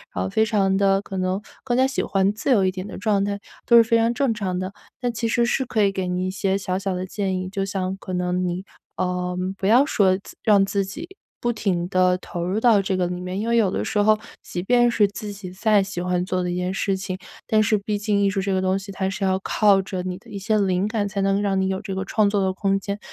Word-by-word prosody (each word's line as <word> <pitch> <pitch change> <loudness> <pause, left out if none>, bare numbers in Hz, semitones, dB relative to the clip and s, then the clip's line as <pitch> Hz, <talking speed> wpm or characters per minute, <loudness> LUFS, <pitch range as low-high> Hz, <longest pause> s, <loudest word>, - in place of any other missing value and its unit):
然 90 - 0
后 95 - -2
非 220 - +2
常 195 -3 +2
地 195 0 +3
可 195 -1 -7
能 185 +2 -1 0.2
更 245 -2 0
加 260 - +5
喜 265 - -1
欢 195 0 +1
自 220 +6 -2
由 210 -6 +4
一 185 - +2
点 185 +1 -6
的 - - -8
状 200 -1 +1
态， 200 0 -2 0.3
都 235 - +5
是 230 - +9
非 230 0 +2
常 230 +1 +2
正 270 -2 +1
常 190 -4 -3
的。 185 +1 -3 0.3
但 245 -1 0
其 230 0 -2
实 235 +1 +2
是 260 +2 0
可 220 -3 +1
以 200 - +3
给 190 -1 -3
你 180 +1 -1
一 185 - -2
些 195 0 0
小 185 -1 -2
小 195 -1 -2
的 185 +1 -3
建 190 -1 -2
议， 185 - -3
就 195 0 -2
像 190 -1 -2
可 190 -1 -7
能 180 0 0
你， 180 +1 -2 0.3
呃， 180 0 -2 0.2
不 190 - -4
要 245 +5 +6
说 195 -10 +3
自 195 - -13
让 205 -3 +5
自 200 0 0
己 300 - -7 0.3
不 240 - 0
停 180 -5 -1
地 185 -1 +3
投 175 -1 -5
入 185 +4 -1
到 225 -3 +5
这 190 0 -1
个 180 - +1
里 180 0 -4
面， 185 +1 -4
因 220 - -2
为 235 - +2
有 215 -4 +3
的 - - -1
时 - - -2
候， 215 +1 +4 0.3
即 175 - -4
便 240 +3 +4
是 215 -3 +3
自 205 +1 -7
己 195 -2 -8
再 205 +2 +3
喜 195 -2 -5
欢 180 0 0
做 185 0 -1
的 180 - -2
一 175 - -2
件 180 0 -1
事 195 0 0
情， 190 -1 -4 0.3
但 215 -1 +3
是 215 0 +3
毕 205 +1 -2
竟 205 -1 +1
艺 200 - +3
术 200 - -1
这 195 +1 -1
个 185 - +1
东 190 0 +1
西 200 +1 -9
它 190 0 -2
是 195 +1 -4
要 190 -1 +2
靠 200 0 +3
着 185 -1 -4
你 180 0 -3
的 - - -18
一 200 - -5
些 215 +3 +1
灵 190 0 +1
感， 215 -2 -1
才 200 0 -3
能 195 0 +2
让 195 -1 +1
你 190 - +1
有 190 0 -1
这 195 - -5
个 190 - -2
创 215 +1 +2
作 200 -1 +1
的 190 -1 +1
空 195 0 0
间。 200 +1 -4
195 Hz, 300 characters per minute, -23 LUFS, 185-210 Hz, 0.3 s, 是